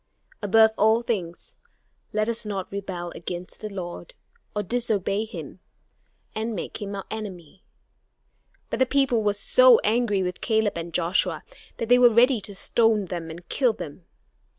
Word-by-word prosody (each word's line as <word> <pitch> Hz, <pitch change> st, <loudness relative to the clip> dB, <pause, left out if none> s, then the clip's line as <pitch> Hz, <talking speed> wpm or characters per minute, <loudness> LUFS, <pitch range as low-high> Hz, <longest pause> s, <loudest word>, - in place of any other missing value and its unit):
Above 220 Hz, +2 st, +5 dB
all 220 Hz, +3 st, +4 dB
things, 210 Hz, -, -4 dB, 0.5 s
let 215 Hz, 0 st, 0 dB
us 235 Hz, 0 st, -1 dB
not 200 Hz, -3 st, -4 dB
rebel 185 Hz, -3 st, -5 dB
against 175 Hz, +1 st, -7 dB
the 215 Hz, -, -4 dB
Lord, 190 Hz, -, -7 dB, 0.4 s
or 210 Hz, -, -1 dB
disobey 215 Hz, -2 st, -1 dB
him, 220 Hz, -, -9 dB, 0.7 s
and 220 Hz, +1 st, -3 dB
make 185 Hz, -, -6 dB
him 200 Hz, -1 st, -4 dB
our 195 Hz, -, -6 dB
enemy." 195 Hz, -5 st, -8 dB, 1.1 s
But -, -, -2 dB
the 260 Hz, -, +3 dB
people 270 Hz, -4 st, +2 dB
were 205 Hz, -1 st, +1 dB
so -, -, +6 dB
angry 215 Hz, -3 st, +1 dB
with 180 Hz, 0 st, -4 dB
Caleb 220 Hz, -2 st, +1 dB
and 170 Hz, 0 st, -5 dB
Joshua 175 Hz, +2 st, 0 dB, 0.3 s
that 230 Hz, -, -3 dB
they 245 Hz, +1 st, +5 dB
were 245 Hz, -1 st, +8 dB
ready 235 Hz, +1 st, +4 dB
to 200 Hz, 0 st, -8 dB
stone 225 Hz, 0 st, +2 dB
them 170 Hz, -2 st, -5 dB
and 170 Hz, +2 st, -10 dB
kill 250 Hz, +2 st, +2 dB
them. 165 Hz, -2 st, -9 dB
210 Hz, 155 wpm, -25 LUFS, 185-230 Hz, 1.1 s, were